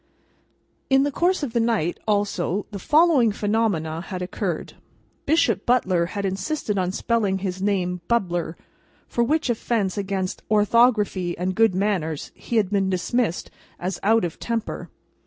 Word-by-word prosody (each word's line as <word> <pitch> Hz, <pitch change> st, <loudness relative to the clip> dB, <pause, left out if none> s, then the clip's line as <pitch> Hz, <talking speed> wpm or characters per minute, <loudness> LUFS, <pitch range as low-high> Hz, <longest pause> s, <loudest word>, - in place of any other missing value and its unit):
In 270 Hz, 0 st, +5 dB
the 290 Hz, -, 0 dB
course 355 Hz, +2 st, +1 dB
of 250 Hz, -5 st, -3 dB
the 235 Hz, -, +2 dB
night, 225 Hz, -7 st, 0 dB
also, 205 Hz, -2 st, 0 dB
the 200 Hz, -, -5 dB
following 300 Hz, -, +4 dB
phenomena 200 Hz, -7 st, 0 dB
had 185 Hz, -2 st, -4 dB
occurred. 180 Hz, -, -3 dB, 0.5 s
Bishop 250 Hz, -, +2 dB
Butler 185 Hz, -9 st, +2 dB
had 200 Hz, -, -1 dB
insisted 200 Hz, +3 st, -2 dB
on 180 Hz, -1 st, 0 dB
spelling 205 Hz, -2 st, 0 dB
his 190 Hz, -1 st, -4 dB
name, 180 Hz, -3 st, 0 dB
"Bubler," 175 Hz, -8 st, 0 dB, 0.5 s
for 235 Hz, -, 0 dB
which 310 Hz, +6 st, +1 dB
offence 220 Hz, -4 st, -1 dB
against 190 Hz, -2 st, -3 dB
orthography 210 Hz, -4 st, +3 dB
and 185 Hz, +1 st, -1 dB
good 225 Hz, -2 st, +3 dB
manners 185 Hz, -6 st, -1 dB
he 235 Hz, -, -6 dB
had 210 Hz, -4 st, +2 dB
been 195 Hz, -2 st, +1 dB
dismissed 190 Hz, +1 st, -1 dB, 0.3 s
as 185 Hz, +2 st, -4 dB
out 220 Hz, 0 st, +3 dB
of 170 Hz, -, -6 dB
temper. 230 Hz, -2 st, -3 dB
205 Hz, 145 wpm, -23 LUFS, 185-235 Hz, 0.5 s, In